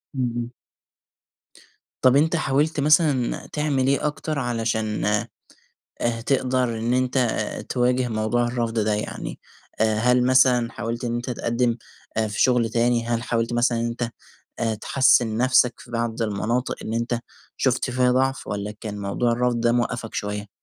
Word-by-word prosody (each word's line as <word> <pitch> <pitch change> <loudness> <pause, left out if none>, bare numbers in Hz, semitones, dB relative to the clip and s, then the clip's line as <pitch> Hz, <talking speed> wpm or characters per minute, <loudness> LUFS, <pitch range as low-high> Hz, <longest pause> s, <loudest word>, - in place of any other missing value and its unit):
امم، 125 -2 0
امم. 120 0 -3 1.5
طَب 130 +1 +5
أنت 160 +4 +3
حاولت 150 0 +1
مثلًا 150 -4 +2
تعمل 145 -3 0
إيه 140 +2 +2
أكتر 150 0 -3
علشان 110 -4 -1 1.0
آآ، 115 -1 0
تقدر 130 -3 +1
إن 115 +2 0
أنت 130 +1 +1 0.5
تواجه 125 0 +1
موضوع 115 +2 0
الرفض 120 -2 -2
ده 105 0 +1
يعني، 105 - -5 0.4
هل 115 +3 +3
مثلًا 125 -2 +4
حاولت 115 +2 -4
إن 120 - -1
أنت 120 +2 -3
تقدم 120 0 0 0.5
في 105 - -4
شُغل 120 -3 +3
تاني؟ 120 0 +1
هل 120 -1 -1
حاولت 115 -1 -1
مثلًا 120 0 +2
إن 115 - -1
أنت 120 0 -3 0.7
تحسن 125 -4 +3
نفسك 125 0 +4
في 120 - -14
بعض 115 0 -2
المناطق 115 +4 -1
إن 110 - -3
أنت 120 +1 -1 0.4
شُفت - - 0
فيها 125 0 +2
ضعف 135 +1 0
والّا 105 0 -3
كان 105 -2 -5
موضوع 100 +4 0
الرفض 120 0 0
ده 120 0 +3
موقفك 120 -1 -2
شوية؟ 105 0 -3
120 Hz, 145 wpm, -23 LUFS, 115-130 Hz, 1.5 s, طَب